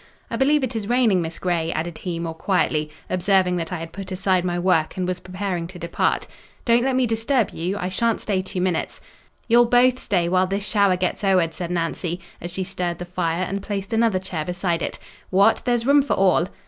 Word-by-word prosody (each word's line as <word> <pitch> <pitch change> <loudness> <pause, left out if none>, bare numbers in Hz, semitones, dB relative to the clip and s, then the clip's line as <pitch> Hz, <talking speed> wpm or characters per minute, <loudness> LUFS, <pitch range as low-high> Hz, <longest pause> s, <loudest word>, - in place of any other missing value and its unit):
I - - -1
believe 285 +2 +3
it 255 -2 -2
is 215 -1 -3
raining, 235 -7 +3
Miss 165 0 -4
Grey," 170 -2 -1
added 165 +1 -4
he, 175 -3 -4
more 165 -1 -3
quietly, 160 -3 0 0.2
observing 185 0 +2
that 165 0 -4
I 180 - -2
had 165 0 -7
put 195 -1 -7
aside 185 -1 +1
my 175 -1 -1
work, 175 -3 +1
and 180 -1 -1
was 180 0 -2
preparing 185 -2 -4
to 180 +1 -11
depart. 170 0 0 0.4
"Don't 235 -1 +4
let 265 0 +1
me 255 -1 +3
disturb 225 +1 +1
you—I 180 +2 -3
shan't 230 +4 +1
stay 195 -3 -1
two 185 -1 -4
minutes." 180 -3 -1 0.5
"You'll 240 0 +5
both 250 +1 +4
stay 175 -4 0
while 185 +1 +2
this 200 +2 -2
shower 200 -4 +3
gets 180 +2 -2
owered," 185 -4 +2
said 170 +1 -5
Nancy, 170 0 -2 0.2
as 175 - -5
she 185 +2 -3
stirred 180 -2 -3
the 175 - -6
fire, 175 -1 -1
and 195 +2 -3
placed 200 +1 -4
another 225 -3 +3
chair 180 -4 -4
beside 175 0 -2
it; - - -3 0.3
"what! 195 +4 +4
there's 240 -2 +1
room 285 +2 +6
for 280 - 0
all." 185 -2 +3
185 Hz, 210 wpm, -23 LUFS, 175-210 Hz, 0.5 s, room